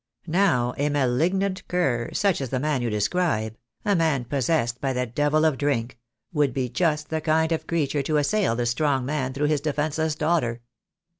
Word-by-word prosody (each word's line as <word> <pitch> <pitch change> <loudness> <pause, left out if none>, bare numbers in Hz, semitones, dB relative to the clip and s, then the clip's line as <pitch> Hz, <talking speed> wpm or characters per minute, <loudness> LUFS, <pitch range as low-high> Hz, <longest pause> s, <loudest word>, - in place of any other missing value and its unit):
Now, 160 -9 +2
a 145 +1 +2
malignant 165 +8 0
cur, 130 -10 0
such 200 -7 +1
as 130 - -3
the 130 - -1
man 145 -2 0
you 120 - -1
de 105 -1 -1
scribe— 110 - 0 0.3
a 205 - +3
man 155 -7 +1
possessed 125 -2 0
by 135 -2 0
the 125 0 -1
devil 145 +6 +1
of 155 -5 +1
drink 125 -5 -1 0.2
— 110 - -46
would 145 -5 +1
be 130 -2 -1
just 150 +3 0
the 160 0 -1
kind 160 +1 +2
of 165 - -2
creature 150 -3 0
to 150 +2 0
assail 165 - +1
the 120 0 -1
strong 130 +2 +1
man 135 -2 -1
through 140 +3 -1
his 150 -2 +1
defenceless 155 +1 -1
daughter. 150 -7 0
145 Hz, 195 wpm, -25 LUFS, 125-160 Hz, 0.3 s, a